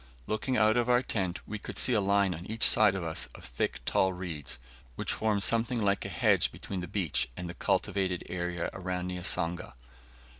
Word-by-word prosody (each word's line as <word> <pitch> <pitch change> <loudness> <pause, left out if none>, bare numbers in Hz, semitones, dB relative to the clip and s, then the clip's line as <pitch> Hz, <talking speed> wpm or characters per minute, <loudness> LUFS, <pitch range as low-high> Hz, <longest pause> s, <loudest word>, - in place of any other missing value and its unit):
Looking 125 +4 -1
out 110 +1 +4
of 120 0 +1
our 125 +1 +4
tent, 95 -7 -2
we 110 0 -5
could - - -8
see 125 - +3
a 105 - +3
line 100 -1 +2
on 85 +2 -8
each 110 +1 -2
side 105 -3 +7
of 95 - -3
us 80 -1 -2
of - - -11
thick - - -2
tall 95 0 +2
reeds, 85 -8 -4 0.4
which - - -1
form 110 -2 0
something 115 +3 +3
like 100 -2 +1
a - - -3
hedge - - +2
between 95 - -6
the 90 - -5
beach 85 -9 -1
and 90 - -5
the 85 - -6
cultivated 95 0 0
area 90 -1 -3
around 90 -1 -3
Niasanga. 90 -4 -2
95 Hz, 195 wpm, -30 LUFS, 90-110 Hz, 0.4 s, side